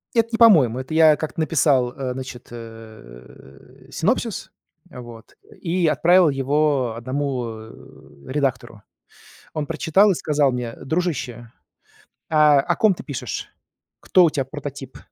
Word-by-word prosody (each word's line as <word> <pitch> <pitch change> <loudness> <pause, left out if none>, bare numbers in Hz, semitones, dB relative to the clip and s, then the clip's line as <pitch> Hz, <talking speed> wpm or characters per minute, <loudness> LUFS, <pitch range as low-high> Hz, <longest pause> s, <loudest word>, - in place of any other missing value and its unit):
Это 230 -1 +2
не - - +1
по-моему, 155 - +5
это 130 +4 -7
я 160 -1 +6
как-то 155 +1 -6
написал, 140 -6 +1
значит, 130 -1 -7
э, 110 - -14
синопсис, - - -2 0.4
вот, 120 -2 -12 0.3
и 175 0 0
отправил 175 +2 +4
его 135 -3 0
1, 130 +1 -3
э, 110 0 -9 0.6
редактору. 125 -6 -2 0.7
Он 155 -2 -3
прочитал 165 +6 +2
и - - +2
сказал 145 -4 +1
мне: 125 -2 -4
"Дружище, 130 -8 -4 0.8
а 150 -2 +5
о 175 +5 0
ком 215 -3 +3
ты - - -10
пишешь? 140 -4 -6 0.5
Кто 185 -2 +4
у 165 - +3
тя 135 -3 -2
прототип?" 140 -2 -8
140 Hz, 125 wpm, -21 LUFS, 120-160 Hz, 0.8 s, я